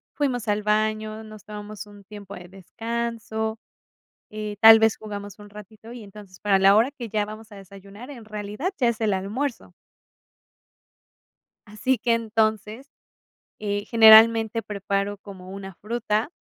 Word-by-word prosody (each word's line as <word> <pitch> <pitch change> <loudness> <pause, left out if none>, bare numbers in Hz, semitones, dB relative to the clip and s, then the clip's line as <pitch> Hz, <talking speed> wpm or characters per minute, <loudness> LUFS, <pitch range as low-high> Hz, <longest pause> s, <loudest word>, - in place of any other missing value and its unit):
fuimos 255 -6 -2
al 210 0 0
baño, 215 +1 -1
nos 215 -1 -13
tomamos 210 0 -8
un 205 -1 -16
tiempo 200 -1 -11
de 175 0 -11
descanso, 220 +3 -5 0.7
eh, 210 -1 -6
tal 225 0 +10
vez 220 0 +2
jugamos 205 -1 -8
un 205 0 -13
ratito, 210 +2 -13
y 240 -2 -10
entonces, 200 -2 -14
para 200 -2 +2
la 195 +1 +6
hora 230 +6 +3
que 255 -5 -8
ya 210 0 -1
vamos 215 +1 -11
a - - -11
desayunar, 200 +5 -13
en 245 -6 -11
realidad 215 - -5
ya 250 - +3
es 235 - -4
el 215 -2 +1
almuerzo. 220 +8 -4 1.9
Así 245 +5 -1
que, 235 +2 +1
entonces, 220 +1 -1 0.7
eh, 205 -1 -3
generalmente 225 0 +6
preparo 200 -1 -3
como 190 -2 -12
una 195 -1 -9
fruta. 220 - -2
215 Hz, 145 wpm, -24 LUFS, 205-225 Hz, 1.9 s, tal